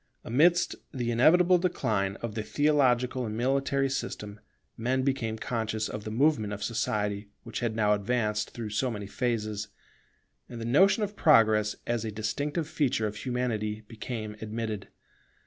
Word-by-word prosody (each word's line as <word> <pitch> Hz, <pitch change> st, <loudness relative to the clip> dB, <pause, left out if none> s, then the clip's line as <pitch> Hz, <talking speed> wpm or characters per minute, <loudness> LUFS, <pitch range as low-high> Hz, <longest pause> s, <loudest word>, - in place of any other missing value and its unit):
Amidst 165 Hz, +9 st, +3 dB, 0.2 s
the 120 Hz, -4 st, -2 dB
inevitable 175 Hz, +9 st, +5 dB
decline 110 Hz, -, 0 dB
of 115 Hz, -2 st, -3 dB
the 110 Hz, -, -2 dB
theological 130 Hz, -2 st, +2 dB
and 110 Hz, 0 st, -4 dB
military 135 Hz, +2 st, +1 dB
system, 105 Hz, -5 st, -4 dB, 0.4 s
men 130 Hz, +3 st, 0 dB
became 125 Hz, -5 st, -1 dB
conscious 110 Hz, -2 st, -2 dB
of 105 Hz, 0 st, -6 dB
the -, -, -3 dB
movement 110 Hz, -3 st, +2 dB
of 105 Hz, 0 st, -5 dB
society, 105 Hz, -2 st, -1 dB, 0.2 s
which 115 Hz, -2 st, -5 dB
had 115 Hz, -2 st, -1 dB
now 105 Hz, -2 st, +3 dB
advanced 105 Hz, 0 st, 0 dB
through 110 Hz, -3 st, -6 dB
so 125 Hz, +5 st, 0 dB
many 105 Hz, -3 st, -5 dB
phases; 110 Hz, -2 st, -2 dB, 0.8 s
and 120 Hz, -, -7 dB
the 115 Hz, -, -4 dB
notion 190 Hz, -, +4 dB
of 205 Hz, 0 st, -3 dB
Progress 110 Hz, -, +4 dB
as 120 Hz, -2 st, -1 dB
a 110 Hz, -, -3 dB
distinctive 145 Hz, +9 st, -2 dB
feature 145 Hz, -8 st, 0 dB
of 105 Hz, 0 st, -3 dB
Humanity 110 Hz, -3 st, -2 dB
became 110 Hz, -1 st, -6 dB
admitted. 110 Hz, -1 st, -4 dB
115 Hz, 150 wpm, -28 LUFS, 105-130 Hz, 0.8 s, inevitable